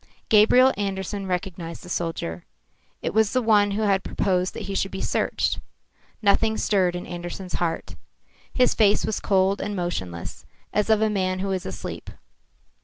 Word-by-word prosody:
Gabriel 245 +5 +6
Andersen 195 0 -3
recognised 180 -2 -4
the - - -11
soldier. 165 - -3 0.6
It - - -2
was 220 -1 +3
the 255 - +2
one 210 -2 +4
who 205 +2 -1
had 195 -2 +2
proposed 185 -2 0
that - - -5
he 195 - -5
should 195 0 0
be 190 - -6
searched. - - 0 0.6
Nothing 220 +2 +3
stirred 185 -4 +2
in 175 - -5
Andersen's 175 +1 -6
heart. 165 -1 -2 0.6
His 250 -1 +3
face 210 -1 +3
was 215 - -1
cold 195 0 +2
and 205 0 -3
motionless, 95 - -4 0.3
as 210 +1 +1
of 220 0 +4
a 220 - +3
man 185 -2 0
who 195 +1 -2
is 185 -1 -2
asleep. 95 - -6
195 Hz, 165 wpm, -24 LUFS, 180-210 Hz, 0.6 s, Gabriel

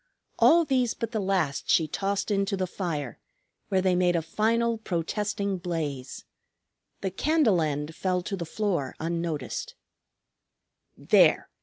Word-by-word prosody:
All 335 +1 +6
these 255 -5 +1
but 230 -2 -4
the 220 - -1
last 190 -8 -1
she 160 - +4
tossed 200 +6 -2
into 195 0 0
the 185 - 0
fire, 160 - -4 0.5
where 190 -1 +1
they 185 -1 +3
made 180 -1 +2
a 165 - 0
final 225 +6 +1
protesting 200 +1 -2
blaze. 150 -7 -4 0.8
The 190 - -2
candle 245 - +2
end 150 0 -2
fell 180 -1 -1
to 195 - -3
the 180 - -4
floor 170 -5 -2
unnoticed. 165 -4 -3 1.2
"There! - - +4
185 Hz, 135 wpm, -27 LUFS, 165-210 Hz, 1.2 s, All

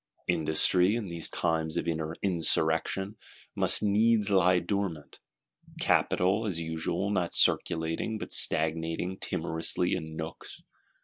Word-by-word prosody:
Industry, 90 +4 +3
in 110 -5 -4
these 85 -2 -1
times 80 -1 -2
of - - -2
Insurrection, 80 +3 0 0.4
must - - +2
needs 105 0 +2
lie 90 -1 +4
dormant; 90 -4 -4 0.6
capital, 95 +5 +1
as 90 -5 -2
usual, 80 +4 -3
not 90 -4 -1
circulating, 80 +7 +2
but - - -5
stagnating 80 +3 0
timorously 80 +2 -2
in 80 0 -5
nooks. 80 0 -8
85 Hz, 110 wpm, -28 LUFS, 80-100 Hz, 0.6 s, lie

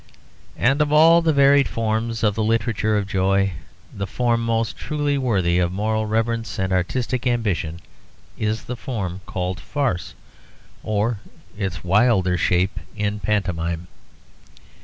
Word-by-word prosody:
And 135 +4 +2
of 150 -1 +1
all 165 +3 +6
the 165 -1 +2
varied 140 -1 +5
forms 115 +1 -2
of 105 -2 +3
the 110 - -1
literature 110 -1 +1
of 100 - -1
joy, 95 0 +1 0.4
the 100 -1 -4
form 115 +3 0
most 115 -1 0
truly 145 -1 -1
worthy 95 -10 +1
of 90 -1 +1
moral 110 +3 -1
reverence 115 +1 -1
and 95 -2 -1
artistic 125 +7 -1
ambition 100 -9 -1 0.5
is 110 +1 -2
the 125 - -5
form 100 -7 -4
called 90 +2 -3
'farce' 130 - -2 0.7
or 110 +1 -1 0.4
its 95 -4 -4
wilder 95 -1 +3
shape 90 +2 +1 0.2
in 105 -1 -2
pantomime. 85 -5 -1
110 Hz, 135 wpm, -22 LUFS, 95-120 Hz, 0.7 s, all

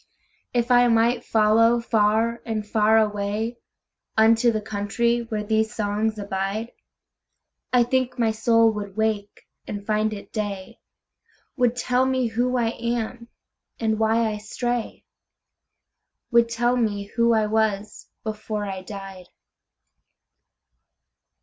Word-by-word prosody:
If 240 0 0
I 245 0 +6
might 235 +1 +2
follow 225 +2 +4
far 225 +1 +1
and 220 -3 -3
far 215 +1 +3
awayUnto 220 +2 -1
the 215 - -1
country 215 +3 -1
where 215 -1 -2
these 220 +1 0
songs 215 +1 -1
abide,I 205 +4 -4
think 255 +1 -1
my 230 -2 +2
soul 225 +1 +3
would 205 -2 -7
wake 215 -2 -2 0.2
and 205 -1 -6
find 215 0 +1
it 205 -2 -9
day, 200 -3 -5 0.8
Would 245 -3 +2
tell 250 +1 +1
me 260 -1 +1
who 245 +3 0
I 235 -2 +1
am, 235 0 -3 0.5
and 220 -1 0
why 225 +1 +2
I 210 - -4
stray,—Would 235 0 -4
tell 240 +1 +1
me 215 -4 0
who 235 0 +3
I 220 -1 +2
was 215 -1 -1 0.2
before 215 -1 -4
I 190 -1 -5
died. 195 -2 -9
220 Hz, 115 wpm, -24 LUFS, 210-235 Hz, 0.8 s, I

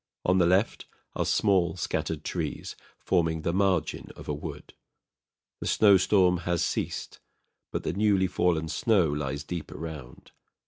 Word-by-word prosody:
On 90 +1 +3
the 85 - +4
left 95 +5 +1 0.3
are - - 0
small 95 -5 +2
scattered 80 - -2
trees, - - -4 0.2
forming 80 -3 0
the 85 - 0
margin 95 -5 0
of - - -11
a 75 - -1
wood. 75 0 -8 0.9
The - - -4
snowstorm 95 -3 +4
has 85 -1 0
ceased; - - -3 0.5
but - - -3
the 75 - -2
newly 100 -1 +3
fallen 90 -3 +1
snow 95 0 +2
lies 70 -1 -3
deep 85 +1 -6
around. 75 -6 -9
85 Hz, 140 wpm, -27 LUFS, 80-95 Hz, 0.9 s, the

